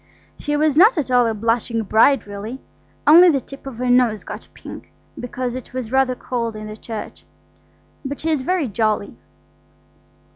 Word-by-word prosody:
She 295 0 -1
was 305 -1 +1
not 405 +5 +6
at 275 -4 -2
all 245 -1 +4
a 225 - 0
blushing 230 +1 -1
bride 225 +5 +3
really; 205 +5 -7 0.5
only 345 +4 +8
the 285 -4 +2
tip 275 +2 -12
of 260 -4 -8
her 250 +1 -2
nose 245 -4 +3
got - - -9
pink, - - -11 0.3
because 245 0 -4
it 255 0 -9
was 245 -3 -4
rather 265 -1 +2
cold 235 -3 -4
in 215 0 -7
the 215 0 -7
church. 220 0 -8 0.8
But 280 0 -5
she 320 - -1
is 300 -4 0
very 340 +1 0
jolly. 215 -1 -1
250 Hz, 175 wpm, -20 LUFS, 225-275 Hz, 0.8 s, only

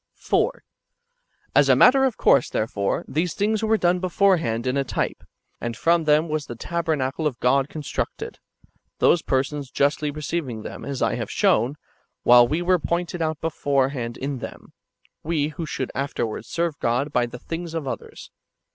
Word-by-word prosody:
4. - - 0 0.9
As - - +5
a - - +7
matter 270 +2 +6
of 255 -4 -1
course, 135 - +4
therefore, 100 -2 -1
these 160 +2 -1
things 210 +1 +1
were 220 0 +3
done 180 -2 +2
beforehand 175 - +1
in 130 +1 0
a 140 - +1
type, - - -3 0.4
and 120 -1 -4
from 170 +2 +2
them 150 +2 +4
was 155 -2 -2
the 120 - -6
tabernacle 155 0 -1
of 130 -5 -4
God 135 +3 +2
constructed; 150 -4 -5 0.6
those 170 - +4
persons 140 0 -1
justly 145 +2 +1
receiving 145 -6 -4
them, - - -8
as 140 -2 -3
I - - +1
have 115 -3 -4
shown, 160 - +2 0.5
while 120 0 +7
we 160 +7 -1
were 180 0 +3
pointed 170 +2 -2
out 160 -1 -1
beforehand 135 -6 -1
in 135 -1 -4
them, - - -9 0.2
— - - -38
[we] 155 -2 0
who 155 +1 -6
should 130 -3 -3
afterwards 135 -5 -3
serve 170 -3 -2
God 125 +6 0
by 120 -1 +2
the 120 - -8
things 165 +5 -6
of 155 -4 -3
others. - - -7
150 Hz, 170 wpm, -23 LUFS, 130-170 Hz, 0.9 s, a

